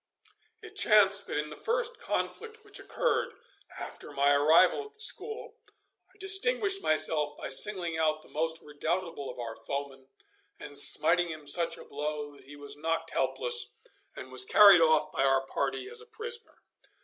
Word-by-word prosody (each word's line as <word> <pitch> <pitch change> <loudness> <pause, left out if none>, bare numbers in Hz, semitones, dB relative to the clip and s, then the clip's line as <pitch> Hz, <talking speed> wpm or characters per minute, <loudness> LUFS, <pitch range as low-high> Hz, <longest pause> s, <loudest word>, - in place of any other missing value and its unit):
It - - -12
chanced 200 -2 +5
that - - -3
in 150 0 -3
the 150 - -9
first 480 +1 -2
conflict 445 -1 -5
which 405 - -8
occurred - - -2 0.4
after - - -8
my 140 +1 +2
arrival 160 - +4
at 425 +1 -16
the - - -20
school 440 0 -1 0.5
I 380 - -27
distinguished 390 0 0
myself 150 -1 +1
by - - -6
singling 175 +1 +3
out 155 -1 0
the - - -18
most 160 +1 -2
redoubtable 155 0 -4
of 125 - -9
our 115 -2 -6
foemen, 135 +2 -7 0.5
and - - -10
smiting 175 -1 +2
him 155 -2 -8
such 165 +4 +1
a - - -12
blow 150 0 -5
that 135 - -19
he 145 +2 -12
was 145 -1 -9
knocked 165 +2 -3
helpless 485 -1 -2 0.4
and - - -10
was - - +3
carried 200 - +7
off 155 -1 +3
by - - -2
our 135 0 +2
party 135 - -3
as 460 +2 -10
a 465 - -16
prisoner. 460 0 -9
165 Hz, 170 wpm, -29 LUFS, -, 0.5 s, carried